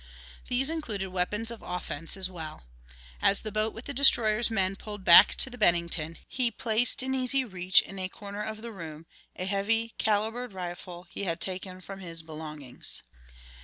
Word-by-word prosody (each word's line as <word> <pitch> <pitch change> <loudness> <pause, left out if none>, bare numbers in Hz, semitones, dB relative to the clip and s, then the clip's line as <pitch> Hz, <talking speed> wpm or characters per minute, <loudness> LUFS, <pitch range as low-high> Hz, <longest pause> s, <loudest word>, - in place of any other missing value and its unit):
These 265 +4 +2
included 215 -12 -3
weapons 210 +5 -1
of 230 - -9
offense 175 -1 -3
as 190 -1 -1
well. 160 - -8 0.6
As 200 - +4
the 215 - -5
boat 215 +1 0
with 225 +3 -10
the 285 - -5
destroyer's 235 -4 +5
men 195 -3 0
pulled 205 -1 -8
back 175 +4 +9
to - - +4
the 250 - -10
Bennington, 170 -4 +2
he 255 -2 0
placed 230 +3 +2
in 265 0 -2
easy 260 +1 +1
reach 185 -4 +3
in 195 - -9
a 185 0 -3
corner 205 +1 -8
of 215 +1 -5
the 235 - -5
room 165 -5 -9 0.3
a 185 - -4
heavy 220 +4 0
calibered 220 +2 0
rifle 175 -1 -7
he 200 - -4
had 165 -1 -2
taken 185 0 -5
from 195 +1 -9
his 165 -3 -5
belongings. 155 -4 -3
195 Hz, 175 wpm, -28 LUFS, 180-225 Hz, 0.6 s, back